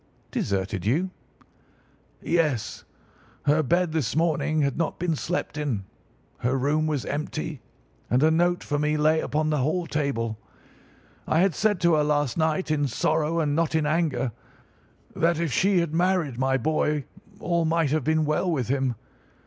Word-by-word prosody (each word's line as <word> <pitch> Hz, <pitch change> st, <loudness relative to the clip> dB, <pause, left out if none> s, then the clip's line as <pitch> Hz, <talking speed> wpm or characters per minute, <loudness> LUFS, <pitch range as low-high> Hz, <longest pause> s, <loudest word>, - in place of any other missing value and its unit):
"Deserted 95 Hz, -1 st, -2 dB
you?" 160 Hz, -, +1 dB, 1.1 s
"Yes. 155 Hz, -10 st, 0 dB, 0.6 s
Her 150 Hz, +2 st, +3 dB
bed 170 Hz, +4 st, +1 dB
this 145 Hz, -7 st, -1 dB
morning 155 Hz, -1 st, +1 dB
had 140 Hz, -2 st, 0 dB
not 165 Hz, -1 st, -1 dB
been 170 Hz, -2 st, 0 dB
slept 165 Hz, -1 st, -3 dB
in, 120 Hz, -10 st, -2 dB, 0.5 s
her 130 Hz, +3 st, 0 dB
room 150 Hz, +4 st, +1 dB
was 150 Hz, -4 st, -1 dB
empty, 150 Hz, -1 st, -4 dB, 0.5 s
and 125 Hz, +4 st, +3 dB
a 160 Hz, -, +5 dB
note 175 Hz, +2 st, +2 dB
for 145 Hz, -1 st, -1 dB
me 150 Hz, +1 st, +1 dB
lay 155 Hz, +1 st, +3 dB
upon 155 Hz, +1 st, 0 dB
the 150 Hz, -, +1 dB
hall 155 Hz, +7 st, 0 dB
table. 130 Hz, -8 st, -2 dB, 0.9 s
I 160 Hz, -, +3 dB
had 190 Hz, -2 st, +3 dB
said 205 Hz, +2 st, +1 dB
to 170 Hz, -1 st, +4 dB
her 150 Hz, -1 st, +3 dB
last 145 Hz, -3 st, +1 dB
night, 160 Hz, +1 st, 0 dB
in 145 Hz, -2 st, +1 dB
sorrow 155 Hz, +5 st, 0 dB
and 145 Hz, -3 st, +1 dB
not 165 Hz, 0 st, +1 dB
in 155 Hz, -2 st, +2 dB
anger, 150 Hz, -5 st, 0 dB, 0.8 s
that 165 Hz, 0 st, +2 dB
if 165 Hz, -6 st, -1 dB
she 190 Hz, +2 st, +3 dB
had 165 Hz, -2 st, -3 dB
married 170 Hz, -7 st, +1 dB
my 135 Hz, 0 st, +2 dB
boy 150 Hz, +2 st, 0 dB, 0.4 s
all 170 Hz, -1 st, 0 dB
might 160 Hz, -2 st, +1 dB
have 155 Hz, -2 st, +1 dB
been 155 Hz, +1 st, +2 dB
well 155 Hz, +5 st, 0 dB
with 130 Hz, -7 st, -1 dB
him. 135 Hz, -2 st, 0 dB
155 Hz, 165 wpm, -25 LUFS, 140-165 Hz, 1.1 s, a